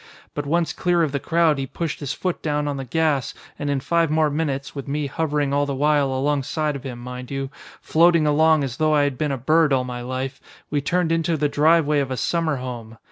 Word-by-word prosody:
But 145 -1 -4
once 170 +2 +1
clear 175 -1 +1
of 155 - 0
the 140 - -1
crowd 165 -1 +2
he 135 - -3
pushed 165 +3 -4
his 145 -2 -4
foot 180 +2 -3
down 150 -1 -1
on 145 -1 -2
the 135 - -4
gas 150 0 0 0.2
and 145 - -2
in 140 -1 +1
five 165 +3 +1
more 155 -1 +2
minutes 140 -3 -2
with 140 -1 -7
me 145 +1 -1
hovering 145 -1 -1
all 145 0 +1
the 140 - -2
while 145 -1 +2
alongside 145 +2 -1
of 140 - -6
him, 130 -3 -6
mind 125 +1 -8
you 135 -1 -4 0.3
floating 170 -1 +4
along 155 0 +4
as 130 -2 -4
though 155 -1 +2
I 145 - +4
had 140 -2 0
been 150 -2 0
a 135 - -1
bird 155 +4 +3
all 130 -1 +2
my 125 -1 -5
life 130 +2 -4 0.3
we 145 -1 +1
turned 175 +3 0
into 165 0 +1
the 150 0 +1
driveway 150 0 +3
of 140 -2 -1
a 130 - -3
summer 165 +5 0
home. 120 -3 -7
145 Hz, 235 wpm, -22 LUFS, 135-160 Hz, 0.3 s, floating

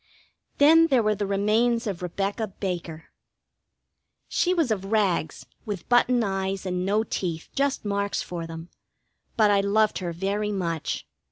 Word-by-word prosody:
Then 325 +3 +6
there 260 -6 +3
were 215 0 +2
the 205 -1 -3
remains 220 +4 +1
of 195 -5 -4
Rebecca 200 +5 -2
Baker. 175 -5 -5 1.2
She 360 - +1
was 330 -9 +1
of 195 -3 -1
rags, 200 -7 0 0.2
with 205 -5 -6
button 245 0 +4
eyes 195 -1 -2
and 180 -1 -2
no 205 +3 +1
teeth, 170 -6 -4
just 275 -4 0
marks 200 0 -1
for 170 -2 -5
them; 165 +1 -8 0.7
but 215 -2 +5
I 200 -1 +4
loved 210 +2 +2
her 175 -2 -3
very 200 +4 -2
much. 170 -5 -3
200 Hz, 150 wpm, -25 LUFS, 185-220 Hz, 1.2 s, Then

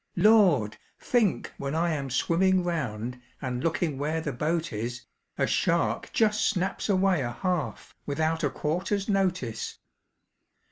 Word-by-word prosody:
"Lord! 175 - +5 0.2
think 225 -7 +1
when 140 +2 -3
I 170 +1 +1
am 140 -3 -3
swimming 185 +8 +2
round, 125 -8 -3 0.2
And 125 -1 -3
looking 160 -3 0
where 155 +3 -1
the 150 -3 -3
boat 160 +3 -1
is, 120 +4 -4 0.3
A - - +2
shark - - +1
just 215 -1 +2
snaps 190 0 -2
away 190 -4 +3
a 120 -2 -2
half, 180 -3 -3
Without 160 +3 0
a 145 - +3
'quarter's 180 +8 -1
notice.' 180 - -1
160 Hz, 135 wpm, -27 LUFS, 135-185 Hz, 0.3 s, Lord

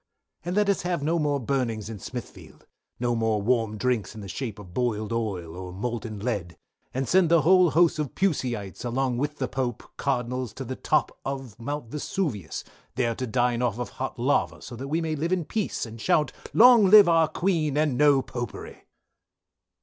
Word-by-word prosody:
_" - - -52 0.4
"And 175 +2 -3
let 210 0 +3
us 200 -2 +2
have 175 -4 -2
no 165 +3 +1
more 145 -2 +1
Burnings 115 -5 -1
in 110 -2 -7
smithfield, 125 +4 -9 0.3
no 120 0 +1
more 110 -2 +1
warm 115 0 0
drinks 115 -5 -1
in 110 - -8
the 100 - -8
shape 110 +2 -5
of 95 -4 -12
boiled 115 -2 -1
oil, 95 -8 -3
or, 90 0 -7
molten 110 +2 -4
lead, 100 -6 -3 0.3
and 130 0 -2
send 185 -3 +4
the 170 -1 +5
whole 185 +1 +6
host 165 +2 +3
of 150 -4 -3
Pusyites 125 - -1
along 125 0 -1
with 150 +2 -2
the 130 - -1
Pope, 125 -4 -3
Cardinals 125 -2 -2
to - - -6
the - - -4
top - - 0
of 135 -5 -5
mount 145 0 -4
Vesuvius, 145 - -3 0.3
there 120 -2 +1
to 130 +2 -4
dine 120 0 +1
off 120 -3 0
of 125 - -4
hot 130 0 -5
lava, 125 +4 +1
so 120 - -8
that 130 +4 -6
we 160 +4 0
may 160 -1 -1
live 160 +4 -2
in 180 -3 0
peace 210 - -2
& - - -9
shout 150 +7 +2 0.2
long 235 -3 +7
live 210 -1 +9
our 165 -2 +4
Queen, 160 -6 0
and 150 -4 +2
No 140 -1 +4
Popery!" 120 -3 -7
125 Hz, 195 wpm, -26 LUFS, 115-155 Hz, 0.4 s, live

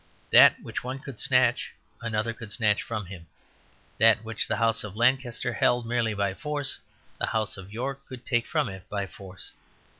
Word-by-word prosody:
That - - +8
which - - -5
one 130 +2 -4
could 135 -3 -10
snatch 125 -2 +2 0.3
another 115 0 -1
could 110 -3 -10
snatch 105 -2 +2
from 110 -3 -4
him; 90 -2 -10 0.7
that 110 0 +6
which 110 -2 -2
the - - 0
House 115 -1 +2
of 105 -2 -8
Lancaster 125 0 +1
held 120 -1 +2
merely 115 -2 0
by 100 -1 0
force 145 +5 -2 0.4
the - - 0
House 110 -2 -1
of 95 0 -11
York 135 +5 -5
could 130 -2 -10
take 120 0 0
from 155 -3 +1
it 95 -1 -9
by 100 -1 -2
force. 95 -1 -11
115 Hz, 180 wpm, -27 LUFS, 105-125 Hz, 0.7 s, That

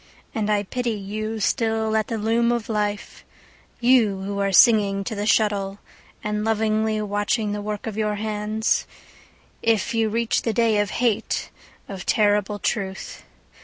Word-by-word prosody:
And 215 -2 -1
I 205 -1 +2
pity 240 +3 -2
you 215 +2 -4
still 220 0 0
at 220 -1 +1
the 230 - -3
loom 230 +2 +2
of 235 -2 -2
life, 210 -1 -3 0.6
You 235 -6 +3
who 200 +1 -3
are 200 0 +1
singing 200 -1 +5
to 205 - -4
the 205 0 -3
shuttle 205 -3 +1 0.5
And 210 0 -2
lovingly 220 0 +1
watching 205 +1 -1
the 205 0 -3
work 210 0 -4
of 220 -3 -4
your 210 -1 0
hands, 215 +1 -1 0.7
If 225 +2 +1
you 225 -1 +1
reach 230 +1 0
the 225 - -1
day 225 -1 +2
of 205 -1 0
hate, 235 -3 -1 0.4
of 190 -3 -8
terrible 210 -2 +2
truth. 195 -2 -3
215 Hz, 155 wpm, -23 LUFS, 205-225 Hz, 0.7 s, singing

